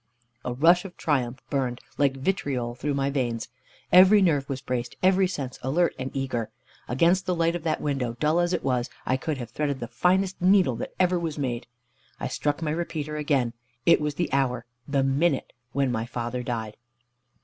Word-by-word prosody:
A - - -2
rush 165 +8 +4
of 190 -3 -10
triumph 130 -5 -1
burned, 130 -3 -1 0.2
like 140 -2 +2
vitriol, 135 -6 -1
through 140 +4 -2
my 140 0 0
veins. 120 -5 -2 0.4
Every 190 +3 +8
nerve 150 -8 +2
was 135 -1 -2
braced, 125 -3 -3
every 190 0 +5
sense 140 -8 -5
alert 160 +7 +1
and 130 0 -3
eager. 125 -5 -2 0.4
Against 170 +8 +2
the 180 - +1
light 165 0 +1
of 175 - -3
that 160 - 0
window, 135 -5 -1
dull 155 +3 +2
as 175 0 +2
it 175 - -1
was, 125 -2 0 0.2
I 130 - +2
could 140 +3 -2
have 120 -3 -7
threaded 140 0 -1
the 120 - -4
finest 185 +10 +1
needle 185 -8 +4
that - - -6
ever 180 -1 +3
was 165 -3 -3
made. 125 -4 -2 0.5
I - - -3
struck 145 +2 -1
my 150 - 0
repeater 155 -2 -3
again. 140 -6 +1 0.3
It 170 - +6
was 150 -1 -1
the 175 -3 -2
hour, 125 -3 +1 0.2
the 140 -2 +1
minute, 135 +2 +1 0.2
when 135 -1 +1
my 115 -1 -2
father 120 +1 -3
died. 115 -3 -4
140 Hz, 190 wpm, -26 LUFS, 125-170 Hz, 0.5 s, Every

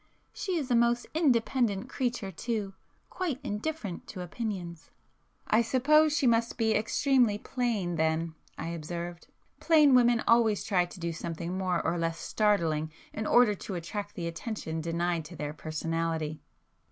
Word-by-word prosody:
She 370 -3 -2
is 275 -5 -3
a - - +5
most 235 +1 +3
independent 245 - +2
creature 245 -7 -2
too; 205 +1 -3 0.4
quite 335 -9 -2
indifferent 210 - -4
to 185 - -7
opinions"— 180 -4 -5 0.6
"I 220 - +4
suppose 300 +6 +4
she 285 - +1
must 230 -1 +2
be 220 -1 +2
extremely 240 0 +2
plain 210 -8 -2
then"—I 160 0 -2
observed; 170 +1 -6 0.3
"Plain 305 -4 +5
women 240 -2 +5
always 230 -3 +4
try 195 -5 +2
to 175 - -12
do 170 -1 -2
something 170 +2 -4
more 185 -2 -1
or 175 - 0
less 165 0 -1
startling 165 -8 +1 0.2
in 215 0 -3
order 240 -3 +5
to 195 -1 -6
attract 200 +4 -5
the 170 - -4
attention 165 -1 -4
denied 170 +1 -1
to 170 +3 -10
their 150 -1 -4
personality." 160 0 -3
205 Hz, 145 wpm, -29 LUFS, 170-240 Hz, 0.6 s, a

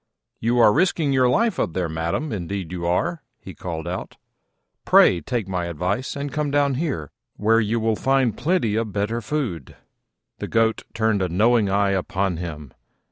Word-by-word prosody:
"You 120 +2 +1
are 110 -3 +6
risking 165 - +2
your 130 -2 +4
life 225 - +1
up 85 - -1
there, 90 -1 -1
madam, 80 - -2
indeed 95 -2 -4
you 85 -2 -3
are," 85 -1 0 0.2
he - - -10
called 85 -2 -6
out: 90 +1 -5 0.7
"pray 90 -2 +5
take 115 +4 -3
my 90 -2 -2
advice 90 - -2
and 140 0 -4
come 150 +1 -1
down 140 -1 +2
here, 130 - -3 0.3
where 115 +2 +3
you 115 +1 0
will 110 0 +1
find 135 -1 +1
plenty 165 - 0
of 110 -2 -2
better 105 +3 -1
food." 110 - -4 0.6
The - - -4
Goat 115 0 +1
turned 110 -3 +1
a 90 - 0
knowing 110 +4 +3
eye 100 0 +2
upon 95 -1 -1
him. 75 -5 -7
105 Hz, 175 wpm, -23 LUFS, 90-125 Hz, 0.7 s, are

